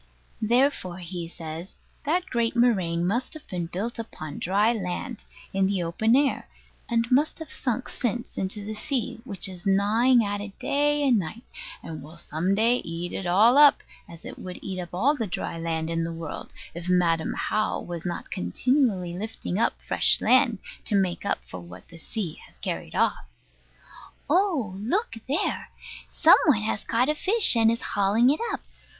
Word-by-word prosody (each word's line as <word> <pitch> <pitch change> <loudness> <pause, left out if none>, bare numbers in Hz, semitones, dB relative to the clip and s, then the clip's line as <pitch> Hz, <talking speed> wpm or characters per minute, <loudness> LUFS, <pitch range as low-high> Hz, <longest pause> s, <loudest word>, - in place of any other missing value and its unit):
Therefore, 235 -5 +2
he 175 -1 -6
says, 165 +1 -8 0.3
that 345 +5 +1
great 235 -8 -1
moraine 185 -9 +2
must 240 - -1
have 310 - -11
been 175 -2 -3
built 205 +8 -4
upon 155 -9 -7
dry 205 +6 +2
land, 200 +2 -4 0.3
in 195 0 +2
the 195 -3 0
open 220 +8 +2
air; 280 0 +1 0.4
and 230 -1 +2
must 285 +5 +3
have 320 -2 -7
sunk 255 -1 -2
since 240 -1 -3
into 200 +2 -4
the 215 - -4
sea, 230 +1 -3
which 200 -6 0
is 185 +1 -7
gnawing 220 +5 +4
at 205 0 -2
it 205 -1 -8
day 290 +2 +1
and 240 -5 +4
night, 200 +7 -6 0.4
and 160 -1 -7
will 155 +4 -12
some 170 +3 -1
day 230 +4 +3
eat 170 -2 -5
it 190 - -3
all 220 +9 +5
up, 295 -1 +7 0.3
as 170 -1 -12
it - - -8
would 180 -1 -7
eat 190 -1 -4
up 175 - -7
all 245 +12 +2
the 230 -6 -2
dry 170 -2 -4
land 165 -1 -2
in 165 0 -1
the 165 - -3
world, 165 -2 -7 0.2
if 170 +1 -5
Madam 170 -3 +2
How 215 0 0
was 170 -2 -6
not 175 -1 -5
continually 190 - 0
lifting 205 -1 -4
up - - +1
fresh - - +3
land, 250 -3 +4 0.3
to 210 - +1
make 190 -1 0
up - - +1
for 90 - -8
what 90 +1 -12
the 165 - -13
sea 180 -3 -5
has - - -21
carried - - -5
off. - - +1 1.0
Oh, 315 - +1
look 370 - -1
there! 285 +5 -1 0.4
some - - +6
one 225 -8 +4
has 215 -1 -2
caught 240 +3 +1
a 300 - +2
fish, 390 - +5
and 225 -1 +5
is 230 +1 0
hauling 205 +6 +4
it 300 - 0
up. - - -3
205 Hz, 180 wpm, -26 LUFS, 175-245 Hz, 1.0 s, up